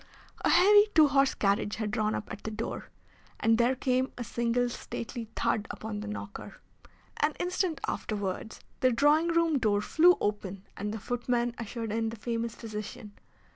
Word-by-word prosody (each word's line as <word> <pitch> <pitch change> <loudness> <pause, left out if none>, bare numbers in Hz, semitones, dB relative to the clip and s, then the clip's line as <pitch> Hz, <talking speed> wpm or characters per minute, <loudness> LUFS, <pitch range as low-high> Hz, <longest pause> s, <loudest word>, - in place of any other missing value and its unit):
A - - +3
heavy, 410 +3 +7
two 310 -2 +7
horsed 275 0 +3
carriage 200 +1 +1
had 215 -2 -3
drawn 215 -1 0
up - - -4
at 205 - -7
the - - -3
door, 220 +1 -5 0.5
and 225 +1 +3
there 245 +2 +3
came 255 +1 0
a 245 - -3
single 240 +1 0
stately 235 -1 -6
thud 220 0 0
upon 215 -1 -5
the 210 - -6
knocker. 210 0 -7 0.6
An 300 +1 +2
instant 355 -3 -1
afterwards 205 0 -4 0.2
the 255 - +4
drawing 295 +7 +4
room 335 -3 +2
door 210 -4 +2
flew 340 +11 +5
open 200 -2 -3
and 205 +1 -3
the 220 - -4
footman 240 +1 -1
ushered 230 0 -4
in 225 +1 0
the 225 - -6
famous 230 0 -3
physician. 210 -1 -7
230 Hz, 170 wpm, -29 LUFS, 215-265 Hz, 0.6 s, heavy